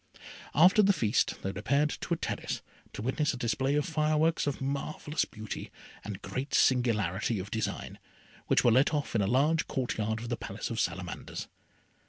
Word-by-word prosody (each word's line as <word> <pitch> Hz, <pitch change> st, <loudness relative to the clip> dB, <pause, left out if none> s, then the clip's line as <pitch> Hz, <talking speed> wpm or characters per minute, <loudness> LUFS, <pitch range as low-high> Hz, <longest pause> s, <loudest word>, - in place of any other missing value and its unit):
After 180 Hz, +7 st, +7 dB
the 200 Hz, -1 st, +5 dB
feast 115 Hz, -, +1 dB
they 95 Hz, -, -1 dB
repaired 140 Hz, +9 st, +1 dB
to -, -, 0 dB
a -, -, -9 dB
terrace, -, -, -3 dB, 0.3 s
to -, -, -6 dB
witness 150 Hz, +4 st, 0 dB
a -, -, -7 dB
display 125 Hz, +4 st, 0 dB
of 150 Hz, -, +1 dB
fireworks 155 Hz, 0 st, +1 dB
of 145 Hz, -, -1 dB
marvellous 140 Hz, +3 st, -2 dB
beauty 110 Hz, -1 st, -7 dB, 0.3 s
and 105 Hz, -2 st, -7 dB
great 135 Hz, +2 st, -3 dB
singularity 115 Hz, -4 st, +2 dB
of 100 Hz, +2 st, -6 dB
design, 110 Hz, -3 st, -3 dB, 0.5 s
which -, -, +3 dB
were 120 Hz, -, +5 dB
let 135 Hz, +6 st, +4 dB
off 145 Hz, -, -2 dB
in 110 Hz, -, +2 dB
a 95 Hz, -, +1 dB
large 145 Hz, +8 st, +2 dB
court 125 Hz, -4 st, -2 dB
yard 110 Hz, +1 st, 0 dB
of 120 Hz, +1 st, -6 dB
the 120 Hz, -, -1 dB
Palace 105 Hz, +2 st, -5 dB
of 115 Hz, -, -2 dB
Salamanders. 90 Hz, 0 st, -3 dB
125 Hz, 180 wpm, -30 LUFS, 110-150 Hz, 0.5 s, After